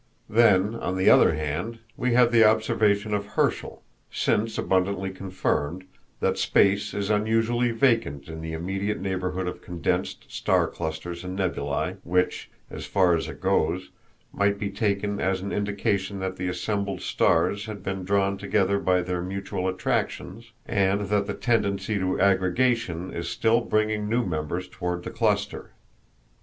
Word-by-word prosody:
Then, 105 -2 +4
on 95 -5 -3
the 95 - +5
other - - +6
hand, 80 +9 -3 0.2
we 125 -1 0
have 120 -1 +5
the 115 -1 +6
observation 110 -1 +2
of 100 0 -1
Herschel, - - 0 0.3
since 110 +2 0
abundantly 95 0 0
confirmed, 95 -3 -2 0.4
that - - +1
space 100 +1 +2
is 100 +1 -1
unusually 115 +3 +2
vacant 115 - +1
in 80 0 -7
the 80 0 -5
immediate 95 +5 -2
neighborhood 95 -1 -2
of 90 - -5
condensed 85 -2 -2
star - - +1
clusters 85 +2 -5
and 90 +1 -5
nebulæ, 70 -7 -1
which, 90 +1 0 0.2
as - - -7
far 95 -3 +3
as 80 - -2
it - - -10
goes, 85 +4 0 0.4
might 100 0 +1
be 100 -1 -3
taken 100 0 -1
as 95 0 0
an 100 - -4
indication 100 -1 -1
that 95 -1 -3
the 90 - -3
assembled 100 +1 -2
stars 100 +6 +1
had 105 -4 -7
been 95 -1 -3
drawn 100 +1 +1
together 100 -1 +1
by 90 -2 +2
their 90 0 -2
mutual 95 0 -3
attractions, 95 +3 -2
and 100 -2 +1
that 100 -1 +1
the - - -3
tendency 100 -3 0
to 95 0 -1
aggregation 95 -1 +1
is 85 - -4
still 115 +1 +2
bringing 110 -2 0
new 120 +1 +1
members 85 +2 -3
toward 90 0 -4
the - - -6
cluster. - - -1
100 Hz, 150 wpm, -25 LUFS, 90-105 Hz, 0.4 s, other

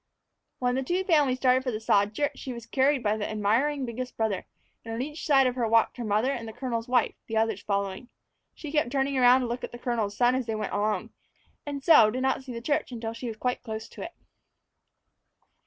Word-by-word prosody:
When 250 -1 0
the 265 - 0
two 350 +8 -1
families 295 -8 +3
started 255 0 +3
for 260 - -1
the 215 -3 -3
sod 205 -1 +2
church, 290 +3 0
she 260 - -5
was 235 -1 -9
carried 265 +2 +2
by 210 0 +1
the 210 - -3
admiring 235 +7 +1
biggest 250 +1 -6
brother, 220 -4 -1 0.4
and 225 0 -5
on - - -4
each 300 +3 -6
side 270 -3 +5
of 250 - +1
her 240 -2 -1
walked 230 +3 +3
her 240 - -4
mother 215 +4 +1
and 235 -4 -4
the 220 - -7
colonel's 235 -1 -3
wife, 250 0 +2
the 225 - -2
others 220 -2 +1
following. 200 +3 -3 0.5
She 300 - -8
kept 300 -5 +1
turning 275 0 0
around 255 0 +6
to 250 - -2
look 240 +1 -4
at - - -5
the 240 - -8
colonel's 230 -5 -2
son 245 0 +4
as 260 -2 -1
they 225 - -1
went 215 -2 -4
along, 210 +1 -1 0.6
and 280 -1 -4
so 245 -9 +7
did 255 +4 -3
not 265 0 +1
see 260 - -8
the 235 -1 -6
church 290 +1 -1
until 225 -2 -4
she 235 +2 -6
was 225 -2 -5
close 225 -2 -3
to - - -11
it. 340 - -6
245 Hz, 230 wpm, -27 LUFS, 220-265 Hz, 0.6 s, so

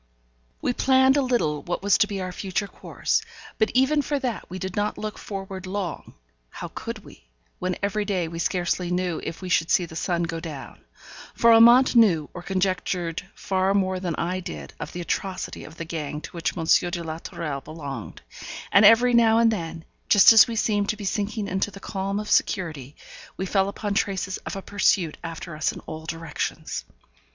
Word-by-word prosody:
We 245 - +1
planned 265 +1 +4
a 285 - +3
little 235 - 0
what 175 +2 -4
was 205 +1 +4
to 210 - +4
be 200 -2 -4
our 185 0 -4
future 195 +2 -3
course; 450 - -1 0.4
but 220 - +3
even 275 +4 +4
for 290 +1 -1
that 255 -5 -4
we 185 - -6
did 190 -1 -5
not 205 0 -1
look 215 0 -5
forward 195 -2 -6
long; 185 -4 -5 0.3
how - - -7
could - - -7
we, - - -16 0.3
when 185 0 -1
every 205 +1 0
day 190 -5 -1
we 165 +1 -6
scarcely 175 0 0
knew 180 -2 -1
if 165 - -6
we - - -4
should 170 -2 +2
see 180 - +3
the 160 - -11
sun 175 0 -1
go 165 -1 -3
down? 155 -5 -8 0.6
For 230 0 +6
Amante 235 +2 +7
knew 170 -10 +3
or 175 - -7
conjectured 185 -2 -1
far 190 0 0
more 190 -2 +1
than 175 -3 -2
I 180 +2 -2
did 180 - -7
of - - -6
the 175 - -5
atrocity 190 +2 -3
of 160 - -13
the 165 - -5
gang 150 -2 -4
to - - -9
which 170 0 -3
M. 165 - -2 0.2
de 170 -1 -4
la 160 0 -5
Tourelle 150 -5 -5
belonged; 145 -1 -8 0.5
and 200 - +6
every 230 +4 +7
now 225 -1 +5
and 230 0 +5
then, 165 -5 -5 0.2
just 205 +2 +8
as 225 - +8
we 230 - -4
seemed 205 -2 +1
to 215 - 0
be 205 - -7
sinking 205 +1 -2
into 190 +1 -1
the 195 - -11
calm 195 0 -3
of 210 - -5
security, 155 - 0 0.4
we 190 - -2
fell 195 0 +1
upon 205 0 -3
traces 195 -2 -1
of - - -4
a 195 - -6
pursuit 185 -5 +1
after 165 0 -6
us 155 - 0
in - - -9
all 160 0 -8
directions. 165 -1 -4
190 Hz, 195 wpm, -25 LUFS, 170-210 Hz, 0.6 s, just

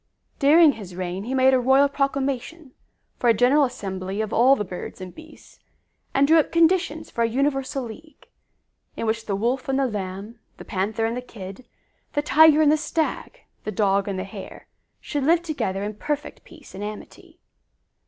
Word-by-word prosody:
During 310 +2 +6
his 195 -8 -10
reign 185 +2 -4
he 260 +3 -3
made 260 0 +4
a 260 - +4
royal 265 +3 +4
proclamation 275 +1 -3 0.5
for 240 - +2
a 230 - +5
general 265 +6 +4
assembly 195 -4 -5
of 220 -1 -2
all 255 +4 +5
the 210 - -3
birds 180 -1 -8
and 185 -1 -8
beasts, 320 0 -16 0.5
and 275 +1 +3
drew 325 +2 +6
up 305 - 0
conditions 335 -1 +1
for 235 - -3
a 230 - +1
universal 270 +1 -1
league, 305 +7 -12 0.7
in - - -3
which 225 0 -2
the 200 - -1
Wolf 245 +6 -1
and 270 - +1
the 275 - +2
Lamb, 205 0 -5 0.2
the - - -11
Panther 215 +3 -2
and 225 +1 -1
the 250 - -4
Kid, 205 -1 -10 0.5
the 290 - 0
Tiger 310 +1 +6
and 295 - +5
the 310 - +3
Stag, 320 +10 -3 0.2
the 215 - -4
Dog 200 -1 +1
and 195 -2 -3
the 185 - -3
Hare, 195 0 -10 0.3
should 290 -2 -3
live 335 +4 +3
together 200 - -3
in 210 +1 -4
perfect 295 +7 -5
peace 310 -5 -16
and 195 - -7
amity. 210 0 -9
250 Hz, 185 wpm, -23 LUFS, 205-290 Hz, 0.7 s, During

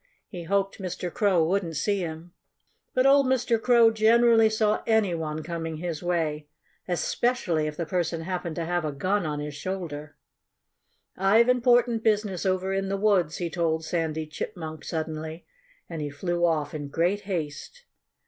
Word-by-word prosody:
He 175 -4 -8
hoped 195 +3 0
Mr. 180 -2 -4
Crow 195 -6 +3
wouldn't 175 -2 -1
see 200 +6 0
him. 170 0 -6 0.6
But 255 - +3
old 275 0 +5
Mr. 245 -3 +1
Crow 235 -2 +5
generally 225 0 +5
saw 215 -1 +1
any 220 -5 +3
one 155 -1 -3
coming 165 -1 -4
his 165 -2 -4
way 160 -4 -1 0.4
especially 175 -3 0
if 150 0 -6
the 170 - -2
person 170 -1 -1
happened 175 -1 -4
to 170 - -3
have 175 0 -1
a 155 - -2
gun 185 +5 0
on 150 -1 -3
his 150 0 -5
shoulder. 150 -3 -6 1.0
"I've 215 +6 +4
important 240 -2 +3
business 210 -4 +1
over 185 +1 0
in 195 0 -1
the 195 - -1
woods," 195 -6 +2
he 170 -2 -3
told 160 -2 -1
Sandy 160 -2 -2
Chipmunk 160 0 -6
suddenly. 160 0 -5 0.4
And 165 -2 -6
he 145 - -3
flew 175 +4 0
off 150 -3 -1
in 145 -2 -5
great 175 +7 0
haste. 175 - -5
175 Hz, 160 wpm, -26 LUFS, 160-210 Hz, 1.0 s, old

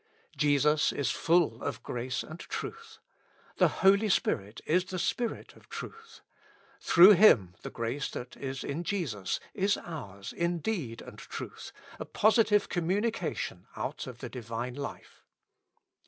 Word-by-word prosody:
Jesus 150 +1 +3
is 140 - -1
full 165 -9 +2
of 125 -5 -4
grace 125 +1 -3
and 160 +2 -10
truth; 455 - -7 0.6
the - - +5
Holy 200 +3 +3
Spirit 105 - 0
is 180 +3 +2
the 185 0 -5
Spirit 235 +6 -2
of - - -20
truth; 450 0 -9 0.6
through 185 +4 +8
Him 135 - +6
the - - -6
grace 120 +5 -3
that 125 0 -7
is 135 -1 -5
in 155 +5 -3
Jesus 145 - -2
is 200 +1 +1
ours 100 - -8
in 170 +1 0
deed 160 - -3
and - - -11
truth, - - -8 0.3
a - - -4
positive 215 -1 +3
communication 175 - -2
out 150 0 -4
of 125 -2 -9
the 125 - -5
Divine 115 0 -5
life. 140 +2 -8
150 Hz, 140 wpm, -30 LUFS, 120-195 Hz, 0.6 s, through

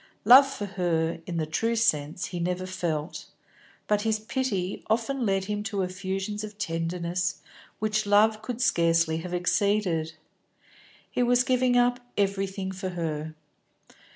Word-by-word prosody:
Love 260 +5 +9
for 270 -7 -5
her, 170 -4 -1
in 175 -2 -3
the 160 - 0
true 225 +9 0
sense, 160 -8 +1
he - - -2
had 170 - -1
never 180 +1 -2
felt, 170 -3 -3 0.6
but 210 -1 +2
his 220 0 +1
pity 215 -5 -2
often 235 +2 0
led 195 -1 +1
him 210 +1 -2
to 205 -2 -2
effusions 190 +3 -3
of 210 -1 -8
tenderness 175 +1 -2 0.4
which 215 -1 -1
love 215 +1 +4
could 235 +1 -5
scarcely 165 -8 +2
have 175 +2 -6
exceeded. 180 -3 +1 1.0
He - - -1
was 245 0 +4
giving 250 -1 +2
up 245 0 +3 0.2
everything 195 -1 -1
for 190 0 -4
her. 160 -3 -4
195 Hz, 145 wpm, -27 LUFS, 175-220 Hz, 1.0 s, Love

